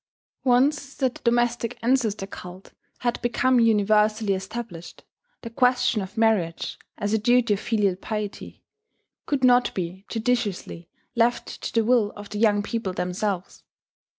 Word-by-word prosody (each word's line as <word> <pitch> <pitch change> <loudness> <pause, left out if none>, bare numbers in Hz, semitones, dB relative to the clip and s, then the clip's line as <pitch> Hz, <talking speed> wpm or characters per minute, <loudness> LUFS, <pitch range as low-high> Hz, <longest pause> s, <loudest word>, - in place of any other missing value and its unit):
] - - -78
Once 275 +2 +2
that 260 -2 0
the - - -14
domestic 240 0 +1
ancestor 230 -5 +1
cult 185 -1 -11 0.3
had 240 -1 -1
become 245 +1 +2
universally 215 -1 +3
established, 195 -2 -7 0.4
the 230 - -5
question 250 -2 +2
of 190 +4 -8
marriage, 215 -7 0 0.2
as 205 +1 -2
a 220 - +3
duty 240 0 +3
of 200 - -2
filial 210 -5 +1
pity, 210 +1 -6 0.6
could 280 -3 -1
not 245 0 +5
be 185 +1 -4
judiciously 220 -7 -2 0.3
left 235 +1 +2 0.2
to - - -4
the 225 -1 +1
will 230 -3 +3
of 205 0 -10
the 210 - -5
young 205 -2 +3
people 205 -3 -3
themselves. 180 +1 -3
220 Hz, 145 wpm, -24 LUFS, 200-240 Hz, 0.6 s, not